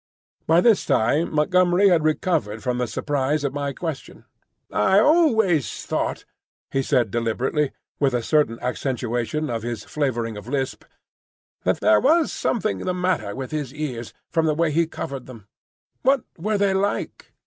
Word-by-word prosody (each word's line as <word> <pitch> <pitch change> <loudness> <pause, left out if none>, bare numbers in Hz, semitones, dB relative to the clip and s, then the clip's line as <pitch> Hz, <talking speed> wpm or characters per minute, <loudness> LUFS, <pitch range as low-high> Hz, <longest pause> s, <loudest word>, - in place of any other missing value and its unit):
By 165 +2 +5
this 225 -2 +4
time 135 +5 +2
Montgomery 180 +5 +3
had 170 -4 +3
recovered 155 - 0
from 125 0 -1
the 125 - 0
surprise 145 +2 -1
of 140 -2 -1
my 145 -1 -2
question. 160 -1 -6 0.5
"I 145 - +3
always 220 - +3
thought," - - -2 0.5
he 135 - +1
said 125 -6 +1
deliberately, 125 +5 0 0.3
with 135 -3 +2
a 120 - -1
certain 150 -6 +1
accentuation 125 +3 -2
of 115 -1 -2
his 120 -1 -4
flavouring 120 -7 -2
of 105 +2 -10
lisp, 135 0 -3 0.8
"that - - +1
there 105 -1 +5
was 330 - +3
something 215 -2 -1
the 180 -1 -2
matter 180 - -1
with 130 +1 -6
his 145 -3 -4
ears, 130 -7 -4 0.2
from 165 -1 +2
the 155 - +1
way 165 0 +1
he 165 +2 +2
covered 135 -5 -6
them. 115 -6 -12 0.5
What 270 -1 +3
were 210 +5 -1
they 200 -1 +2
like?" 200 +1 -2
145 Hz, 160 wpm, -23 LUFS, 125-175 Hz, 0.8 s, By